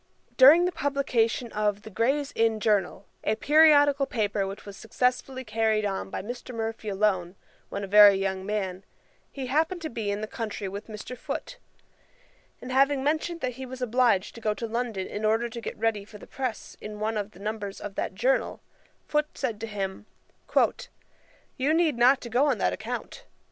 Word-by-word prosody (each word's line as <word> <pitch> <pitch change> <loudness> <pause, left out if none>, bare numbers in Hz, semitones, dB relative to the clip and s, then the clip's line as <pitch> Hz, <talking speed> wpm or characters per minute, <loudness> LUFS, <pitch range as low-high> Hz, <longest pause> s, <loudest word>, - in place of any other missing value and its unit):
During 295 +7 +8
the 360 - 0
publication 255 -6 0
of 210 -1 -1
The 220 - -10
Grays 270 +8 0
Inn 225 -1 +2
Journal, 200 -2 0 0.2
a 215 - +1
periodical 290 -1 +5
paper 205 -5 -1
which 195 +1 -8
was 200 -1 -9
successfully 250 +4 -1
carried 220 -1 +1
on 195 -1 -3
by - - -5
Mr. 245 +2 -7
Murphy 225 -1 -4
alone, 190 -3 0 0.3
when 200 - -4
a - - -4
very 205 0 +8
young 190 -1 -2
man, 195 -2 -3 0.5
he 270 -2 -5
happened 315 +7 0
to 315 - -4
be 225 -3 -3
in 200 0 -1
the - - -2
country 215 -2 -5
with 200 +3 -7
Mr. 215 +3 -7
Foote; - - -6 1.0
and 255 - -8
having 275 +1 +3
mentioned 315 +3 -1
that 250 -1 -3
he - - -4
was 260 0 -8
obliged 245 -5 +2
to 230 - -11
go 215 -1 0
to 230 - -4
London 230 -4 -3
in 210 - -6
order 225 +2 +2
to 235 +1 -7
get - - -6
ready 220 -2 0
for 210 +1 -13
the - - -13
press 255 -4 -5
in 210 0 -7
one 220 +1 -1
of 205 -1 -2
the 180 - -18
numbers 210 -1 -4
of 205 - -7
that 190 - -3
Journal, 250 +7 +1 0.5
Foote 300 0 -1
said 235 -6 -2
to 225 - -3
him, 200 -1 -5 1.5
'You 285 +5 +2
need 320 -7 +2
not 255 +3 +5
to 235 - -7
go 260 +5 +3
on - - +2
that - - +1
account. - - -6
225 Hz, 190 wpm, -27 LUFS, 205-260 Hz, 1.5 s, During